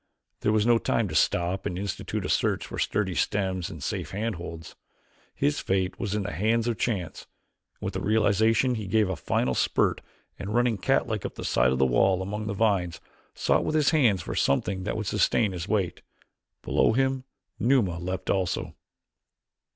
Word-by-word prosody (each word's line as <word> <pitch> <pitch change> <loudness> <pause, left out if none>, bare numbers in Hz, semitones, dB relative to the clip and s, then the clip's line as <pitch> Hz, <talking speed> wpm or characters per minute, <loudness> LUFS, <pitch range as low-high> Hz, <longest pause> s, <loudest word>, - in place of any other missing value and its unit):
There 105 - +1
was 110 0 +2
no 120 -1 +4
time 115 -2 0
to - - -6
stop 90 +2 +1
and 90 - -4
institute 100 0 -3
a - - -3
search - - +1
for - - -7
sturdy 95 -3 0
stems 95 0 -1
and 80 -7 -8
safe - - -3
handholds. 90 -6 -5 0.6
His 145 +1 +1
fate 95 -1 -1
was 105 -2 -2
in 105 - -1
the 100 - -4
hands 110 +8 +1
of 115 -3 -1
chance 95 -8 -2 0.5
and - - -8
with - - -2
the - - -3
realization 110 +3 +3
he 110 -4 -4
gave 105 0 +2
a 95 - -1
final 65 -5 0
spurt - - +1 0.4
and 100 +5 -4
running 120 -4 +2
catlike - - 0
up - - -5
the - - -6
side 60 +1 +3
of 65 - 0
the 65 - +4
wall 95 +9 +3
among 105 +2 -4
the 100 - -2
vines, 95 -5 +1 0.4
sought - - +2
with 155 - -1
his 150 -2 +3
hands 115 - +3
for - - -5
something 95 +7 0
that 105 - -2
would 110 - -3
sustain 105 +1 +2
his 90 -1 -5
weight. 100 -5 -1 0.6
Below - - +2
him 130 +1 +1 0.4
Numa 110 -8 +2
leaped 90 +2 -3
also. 95 -3 -1
100 Hz, 185 wpm, -27 LUFS, 90-110 Hz, 0.6 s, no